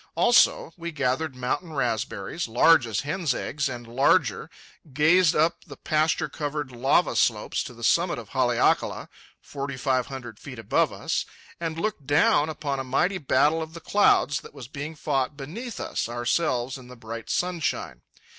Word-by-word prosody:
Also, 240 -8 +4
we 170 0 -5
gathered 140 0 -1
mountain 145 +7 -3
raspberries, 120 - -2
large 125 +3 +5
as 110 -4 -1
hen's 155 0 -1
eggs 140 -1 -2
and 120 -2 -7
larger, 120 +4 +2 0.4
gazed 155 +5 +4
up 165 +3 +1
the - - -11
pasture 155 0 +1
covered 145 -2 -4
lava 125 +3 +2
slopes - - +1
to - - -8
the - - -12
summit - - +2
of - - -9
Haleakala, - - +1 0.3
forty 140 -1 -6
five 130 -1 0
hundred 120 -5 -8
feet 130 -3 -9
above 115 - +1
us, - - -2 0.3
and 165 -1 -3
looked 205 -9 -3
down 145 +1 +3
upon 145 -3 -3
a - - -2
mighty 180 +9 0
battle 150 +2 +2
of 160 +1 -7
the - - -6
clouds 165 -6 +3
that - - -14
was 130 -5 -9
being 150 +3 -6
fought 135 -1 -1
beneath 200 - -7
us, - - -3
ourselves 125 +1 -1
in 125 - -13
the 125 - -11
bright 115 0 -8
sunshine. 170 - -2
140 Hz, 165 wpm, -25 LUFS, 125-160 Hz, 0.4 s, large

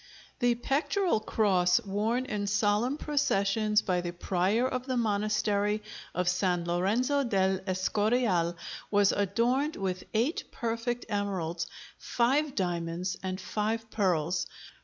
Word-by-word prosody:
The 245 -1 +3
pectoral 290 - +1
cross 190 -4 +2
worn 220 +4 -1
in 205 -4 -3
solemn 205 +6 +1
processions 215 -8 +1
by 180 -2 0
the 175 -1 -4
prior 190 +7 +1
of 255 0 -3
the 255 -1 0
monastery 210 -1 +1 0.3
of 180 0 0
San 180 -1 +1
Lorenzo 220 +11 +1
del 190 -5 +1
Escorial 190 -2 +1 0.3
was 205 -1 +4
adorned 240 +9 +1
with 185 -2 -3
eight 245 +9 +1
perfect 235 +1 -2
emeralds, 185 -6 -2 0.3
five 275 +4 +1
diamonds, 175 -1 -2
and 185 0 -3
five 220 +3 -2
pearls. 180 -4 +1
205 Hz, 115 wpm, -29 LUFS, 185-235 Hz, 0.3 s, was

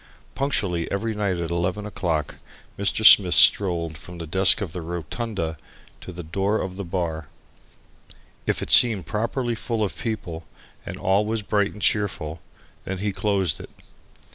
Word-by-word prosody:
Punctually 100 -12 -1
every 110 +3 -2
night 100 -4 -1
at 85 -1 -4
11 90 +4 -2
o'clock 85 -7 -3 0.4
Mr. 100 +2 0
Smith 95 -4 +8
strolled 85 -5 +4
from 90 0 -11
the 85 - -6
desk 95 +4 +4
of 95 -7 -5
the 90 - -5
"rotunda" 85 +1 -4 0.4
to - - -9
the 90 0 -8
door 95 +6 -1
of 95 -1 -5
the 100 - -5
bar. 85 -4 -4 1.2
If - - 0
it - - -4
seemed 110 -7 +6
properly 120 +3 -2
full 115 0 -3
of 100 - -3
people 95 -8 -5 0.4
and - - -6
all 95 +2 +1
was 110 0 -2
bright 100 0 0
and 105 - -11
cheerful, 85 -7 -1 0.4
then 95 - -5
he 100 +2 -2
closed 95 -5 -1
it. - - -10
95 Hz, 160 wpm, -23 LUFS, 85-105 Hz, 1.2 s, Smith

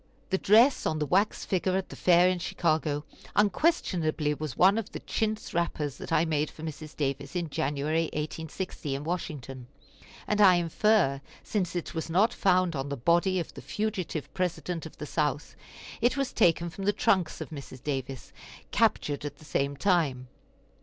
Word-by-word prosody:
The 190 - +2
dress 230 +7 +5
on 155 - 0
the 150 - 0
wax 195 +7 +1
figure 185 0 0
at 190 - -3
the - - -9
fair 175 0 +5
in 185 -1 +1
Chicago 155 -3 0 0.3
unquestionably 180 - +2
was 150 -4 -5
one 195 +4 +5
of 220 -1 -6
the - - -4
chintz 220 -1 -2
wrappers 155 -4 -1
that - - -8
I 165 - +3
made 155 -2 0
for 155 - -12
Mrs. 155 -1 -7
Davis 140 +1 -3
in 170 -4 -2
January, 155 +2 0
1860, 155 -1 -4
in 140 - -5
Washington; 145 -7 -5 0.6
and 210 0 +1
I 190 -3 +8
infer, 175 -4 +2 0.2
since 180 -5 -2
it 175 - -3
was 160 0 -4
not 195 +7 +3
found 185 -3 +2
on 135 +1 -3
the 140 - -3
body 175 +8 +2
of 170 - -5
the - - -9
fugitive 200 -8 -3
President 180 -2 -2
of - - -16
the 150 - -6
South, 150 -1 -2 0.5
it 240 +4 +2
was 275 -1 -1
taken 170 -4 +3
from 195 +3 -6
the 205 - +3
trunks 190 -4 +1
of - - -7
Mrs. 140 -4 -9
Davis, 135 -2 -4 0.4
captured 145 -1 +1
at 145 -1 -5
the 155 - -17
same 140 0 -1
time. 145 -9 +1
165 Hz, 175 wpm, -28 LUFS, 145-185 Hz, 0.6 s, I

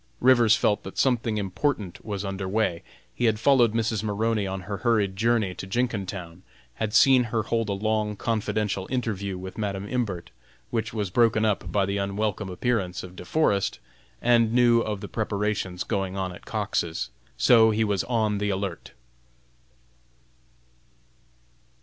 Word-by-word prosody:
Rivers 120 -3 +5
felt 105 -2 +1
that 95 - -10
something 120 -4 +1
important 100 0 -2
was 100 -2 -4
under 95 -1 -4
way. 100 -5 0 0.3
He 120 - -1
had 110 -2 +2
followed 120 -2 +4
Mrs. 110 -2 0
Maroney 110 0 0
on 95 0 -4
her 100 +2 -5
hurried 105 -3 +1
journey 110 -2 +1
to 95 - -8
Jenkintown; 95 -6 -3 0.4
had 110 -1 -2
seen 130 -2 +6
her 110 -1 -1
hold 115 -1 -1
a - - +1
long 105 +1 -1
confidential 105 -3 -1
interview 100 -7 -2
with 95 +3 -8
Madam 100 -1 -3
Imbert, 100 -8 -3 0.4
which 115 -2 -1
was 105 -4 -3
broken 110 0 +3
up 105 -2 -1
by 100 -2 +2
the 100 +1 -2
unwelcome 100 0 -2
appearance 95 -2 -1
of 90 0 -10
De 90 - -9
Forest, 100 - +1 0.5
and 115 -2 +4
knew 120 -1 +5
of 105 -3 -3
the - - -6
preparations 105 -4 -2
going 95 -1 -2
on 95 -1 -2
at - - -14
Cox's. 85 -1 -2 0.3
So 115 -2 +6
he 110 +1 +1
was 100 -3 0
on 110 -4 0
the 105 0 -1
alert. 95 -3 -4
105 Hz, 155 wpm, -26 LUFS, 95-115 Hz, 0.5 s, seen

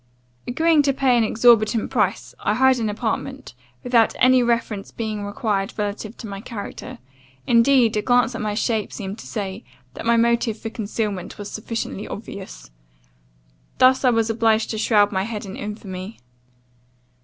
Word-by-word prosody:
"Agreeing 320 +4 +3
to 280 -1 +1
pay 265 -2 +2
an 235 - +3
exorbitant 225 -1 +3
price, 210 -3 0
I 210 - 0
hired 260 +1 +4
an 220 -2 -1
apartment, 240 +5 -4 0.3
without 235 -3 +3
any 255 0 +5
reference 230 -4 -1
being 215 -2 -4
required 205 -1 -2
relative 210 +1 -4
to 225 - -8
my 200 -1 -7
character: 220 -3 -7 0.5
indeed, 235 -1 +4
a 210 - +1
glance 245 +1 +2
at 230 - -5
my 210 -1 -2
shape 220 -1 -1
seemed 200 0 -6
to - - -10
say, 200 0 -5 0.3
that - - -6
my 235 0 +4
motive 235 -1 +2
for 225 0 -6
concealment 210 -3 -4
was 205 0 -7
sufficiently 215 - -5
obvious. - - -9 1.1
Thus 260 +1 +5
was 230 -3 +2
I - - -2
obliged 225 -1 +2
to 220 - -3
shroud 205 -2 +3
my 190 -2 0
head 210 +1 -5
in 195 - -7
infamy. 205 -1 -7
225 Hz, 160 wpm, -22 LUFS, 205-240 Hz, 1.1 s, any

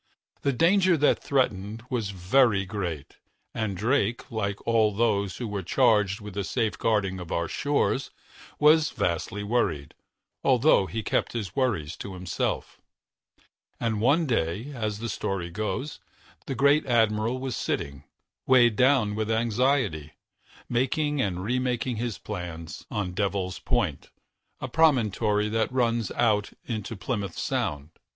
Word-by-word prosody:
The 140 - +1
danger 180 +6 +4
that 150 - +3
threatened 110 -5 -1
was 115 -5 -1
very 100 +2 +2
great, 90 -7 -5 0.4
and 110 -4 -2
Drake, 115 +2 0
like 100 -3 -2
all 115 -2 +3
of 100 - -9
those 100 -5 +1
who 120 - -4
were 105 -2 -3
charged 105 0 +2
with 105 -1 -8
the 100 0 -2
safeguarding 105 -4 0
of 90 -2 -8
our 85 - 0
shores, 140 -1 0 0.5
was 155 +1 +5
vastly 90 +4 -2
worried, 100 - -1 0.5
although 95 - +4
he 110 +2 -4
kept - - 0
his 105 -6 -4
worries 100 - 0
to 95 -2 -7
himself. 90 -1 -3 1.0
And 110 -3 -1
one 145 +8 +3
day, 115 - -1
as 110 -5 -3
the 115 +2 -4
story 95 -5 -3
goes, 110 - -3 0.5
the 135 - -2
great 140 +3 +3
admiral 115 0 +2
was 130 -2 -4
sitting, 70 0 -3 0.4
weighed 120 -4 +5
down 125 -4 +3
with 110 +1 -2
anxiety, 115 - +1 0.5
making 140 +4 0
and 90 -5 -2
remaking 125 +1 -1
his 115 -2 -3
plans, 85 -5 -7
on 100 -4 -2
Devil's 95 -1 -2
Point, - - -1 0.5
a - - -4
promontory 110 -8 +2
that 110 +1 0
runs 120 -4 +1
out 105 -4 +1
into 110 -1 -4
Plymouth 100 -1 -4
Sound. 75 +2 -2
110 Hz, 135 wpm, -26 LUFS, 100-125 Hz, 1.0 s, was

